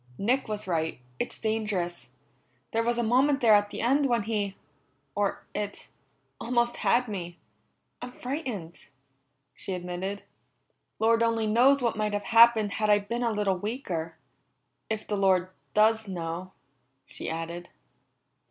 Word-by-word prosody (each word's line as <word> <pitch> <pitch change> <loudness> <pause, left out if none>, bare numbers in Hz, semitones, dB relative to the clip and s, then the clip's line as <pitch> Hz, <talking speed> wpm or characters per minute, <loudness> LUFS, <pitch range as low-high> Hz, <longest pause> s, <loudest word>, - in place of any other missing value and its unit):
"Nick 250 +7 +1
was 215 -1 -3
right; 160 -6 -1 0.2
it's - - -3
dangerous. 210 -6 -2 0.6
There 225 - +1
was 235 +1 0
a 240 - +1
moment 265 +5 +3
there 230 -4 +5
at 205 0 +4
the 205 - -5
end 275 +4 +3
when 235 -4 +1
he 205 -2 -2 0.6
or 205 -1 -1
it 205 -1 -5 0.5
almost 240 0 0
had 245 +1 +2
me. 175 -5 -5 0.6
I'm 250 - -6
frightened," 245 - -5 0.7
she 190 - -5
admitted. 180 +3 -4 0.7
"Lord 230 +1 +3
only 230 -1 +2
knows 250 +5 +4
what 235 - +1
might 210 -1 -1
have 205 0 -2
happened 230 -2 +7
had 215 +1 0
I 205 - +7
been 230 +4 -3
a 235 -1 +1
little 205 -3 0
weaker. 180 -7 -4 0.7
If 220 -1 -2
the 205 - -1
Lord 185 -2 +3 0.3
does 220 +1 +4
know," 175 0 -5 0.5
she - - -6
added. 170 +2 -5
210 Hz, 145 wpm, -28 LUFS, 190-235 Hz, 0.7 s, happened